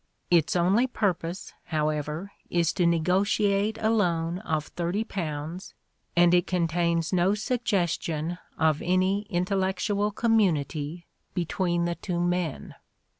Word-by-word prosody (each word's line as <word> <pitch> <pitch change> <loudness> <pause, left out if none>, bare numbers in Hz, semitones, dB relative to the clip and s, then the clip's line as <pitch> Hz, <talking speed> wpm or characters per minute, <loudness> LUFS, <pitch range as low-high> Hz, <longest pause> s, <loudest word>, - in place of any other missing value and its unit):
Its 170 -2 +3
only 190 +8 +3
purpose, 185 -6 -2
however, 155 +3 -2 0.2
is 170 -2 +1
to 175 -3 +2
negotiate 200 +5 +2
a 220 - +2
loan 175 -5 +1
of 155 -7 -3
£30 175 -3 -3 0.4
and 175 0 +5
it 175 -1 +3
contains 170 -1 0
no 185 +3 +3
suggestion 175 - -1 0.2
of 160 -2 +2
any 185 +3 +1
intellectual 190 +2 0
community 170 - 0 0.3
between 175 0 0
the 170 - 0
two 175 0 -4
men. 175 -3 -1
175 Hz, 110 wpm, -27 LUFS, 165-200 Hz, 0.4 s, and